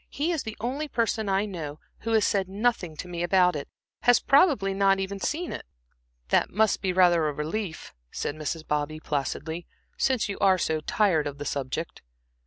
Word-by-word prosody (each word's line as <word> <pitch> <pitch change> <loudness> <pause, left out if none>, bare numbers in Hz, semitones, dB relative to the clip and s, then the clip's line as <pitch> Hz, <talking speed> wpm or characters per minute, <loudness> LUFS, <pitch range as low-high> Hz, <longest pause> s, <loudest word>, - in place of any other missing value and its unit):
He 305 +5 -1
is 325 -5 -1
the 220 -1 -7
only 265 +7 -2
person 225 -5 0
I 195 +2 +2
know 160 -7 -6 0.2
who 225 0 -2
has 220 -2 +4
said 195 -2 +1
nothing 200 -5 0
to 180 - -7
me 175 -1 -4
about 180 -1 +4
it, 145 - -4 0.3
has 245 0 +5
probably 275 - +4
not 195 0 +3
even 195 +1 -3
seen 330 - -2
it." - - -6 0.7
"That - - +3
must 220 +1 +2
be 190 - 0
rather 175 -4 +4
a - - -4
relief," 160 +4 -4 0.2
said - - -3
Mrs. 155 +1 -4
Bobby, 150 +1 -1
placidly, 155 +3 -3 0.3
"since 260 -5 +2
you 200 - -5
are 190 -2 +5
so 160 -3 0
tired 160 -2 +2
of 145 -1 -6
the 145 - -6
subject." 140 +4 -3
190 Hz, 190 wpm, -27 LUFS, 155-220 Hz, 0.7 s, has